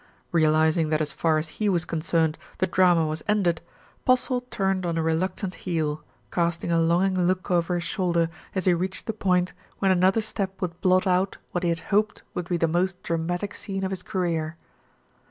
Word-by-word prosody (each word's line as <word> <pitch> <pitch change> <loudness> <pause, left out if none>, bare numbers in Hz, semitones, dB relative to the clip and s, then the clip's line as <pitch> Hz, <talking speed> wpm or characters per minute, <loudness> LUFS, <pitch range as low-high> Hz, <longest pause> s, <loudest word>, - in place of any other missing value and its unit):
Realising 155 0 +3
that 155 0 +2
as 155 -1 -1
far 160 -2 +2
as 155 +1 -2
he 210 - +3
was 175 -4 +1
concerned, 160 -1 0 0.2
the 185 - +2
drama 175 -3 +4
was 155 0 -3
ended, 185 -6 +2 0.4
Postle 255 0 +2
turned 190 -4 0
on 170 -2 -1
a 165 - +1
reluctant 180 +4 -1
heel, 155 -5 -2 0.3
casting 170 0 0
a 165 0 +3
longing 180 +2 +2
look 185 +1 -1
over 175 0 +2
his 175 - -1
shoulder 170 -1 0 0.2
as 190 - -1
he 185 - +5
reached 185 +2 -2
the 225 - -2
point 180 -3 +1 0.2
when 195 -1 +2
another 185 +4 +4
step 195 -3 -3
would 175 -2 -4
blot 185 -1 +4
out 185 +1 +1
what 175 - -1
he 175 - +1
had 170 0 -1
hoped 215 +2 +1
would 175 -1 -4
be 175 - +1
the 165 - +2
most 180 +3 0
dramatic 175 +4 -2
scene 195 -2 -4
of 190 - -1
his 190 -1 -4
career. 170 -5 -2
175 Hz, 190 wpm, -25 LUFS, 165-190 Hz, 0.4 s, he